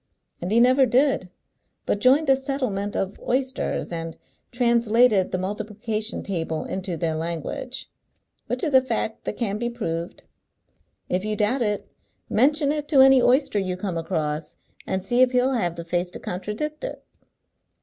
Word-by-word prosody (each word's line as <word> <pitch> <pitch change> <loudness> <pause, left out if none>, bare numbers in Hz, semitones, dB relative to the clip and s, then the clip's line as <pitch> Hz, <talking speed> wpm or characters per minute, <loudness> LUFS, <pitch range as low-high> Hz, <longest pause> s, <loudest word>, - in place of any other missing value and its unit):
And 175 +3 -3
he 225 - +4
never 255 +2 +5
did, 255 -6 +2 0.6
but 205 - 0
joined 270 +8 +4
a 270 - +6
settlement 255 -7 -2
of 195 +1 -2
oysters, 260 -4 -1
and 165 -1 -5 0.3
translated 235 -4 +3
the - - 0
multiplication 215 +3 -3
table 165 -4 -3
into 185 -2 -4
their 160 0 -1
language, 170 - -4 0.6
which - - -2
is 305 -4 0
a 260 - +7
fact 225 -3 -3
that - - -4
can 210 -3 -2
be 240 +1 -1
proved. 170 -8 -4 0.8
If 185 +1 -1
you 215 0 -1
doubt 215 +6 +1
it, 210 -3 -1 0.4
mention 285 +5 +3
it 300 -1 -3
to 285 -4 +5
any 265 -1 +7
oyster 255 -4 +3
you 185 -2 -2
come 185 -2 -3
across, 155 -2 -3 0.3
and 190 0 -1
see 240 +6 +2
if 255 0 +4
he'll 250 +2 +3
have 175 -9 0
the 170 -1 -7
face 175 +1 -1
to - - -8
contradict 210 - -4
it." - - -6
215 Hz, 160 wpm, -24 LUFS, 185-255 Hz, 0.8 s, a